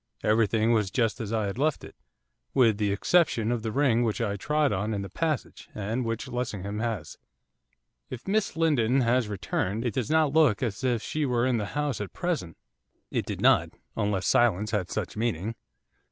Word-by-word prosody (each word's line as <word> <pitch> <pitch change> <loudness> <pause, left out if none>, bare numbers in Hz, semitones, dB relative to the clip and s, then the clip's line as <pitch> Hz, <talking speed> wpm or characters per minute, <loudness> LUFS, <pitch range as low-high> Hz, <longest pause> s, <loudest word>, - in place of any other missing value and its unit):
Everything 110 +1 +3
was 105 -4 +1
just 115 +2 0
as 110 -2 -4
I 110 -2 0
had 100 +5 -4
left 155 +1 +1
it, - - -11 0.6
with 115 -6 +4
the 105 -2 +1
exception 115 - +2
of 120 -2 -1
the 110 0 -3
ring 130 -2 +2
which 115 0 -1
I 105 -4 -1
trod 150 +6 +1
on 105 +3 -1
in 100 - -3
the 100 - -8
passage, 155 -1 -3
and 110 +5 -2
which 115 +2 -3
Lessingham 105 -5 -4
has.' 110 - -4 0.9
'If 130 +5 -8
Miss 205 -4 0
Lindon 135 -6 +3
has 120 -1 +2
returned, 105 +2 -2
it 120 - -1
does 125 -1 -2
not 155 -2 +3
look 145 -9 +4
as 115 0 -3
if 120 -4 +1
she 155 - -2
were 125 -3 +1
in 130 -2 +2
the 105 -2 -2
house 145 -7 -1
at 100 - -6
present.' 155 - -3 0.5
It - - -1
did - - -4
not, - - +4 0.2
unless 100 -2 -1
silence 110 -3 +3
had 100 -5 -1
such - - -4
meaning. 110 -2 -1
115 Hz, 190 wpm, -27 LUFS, 105-130 Hz, 0.9 s, with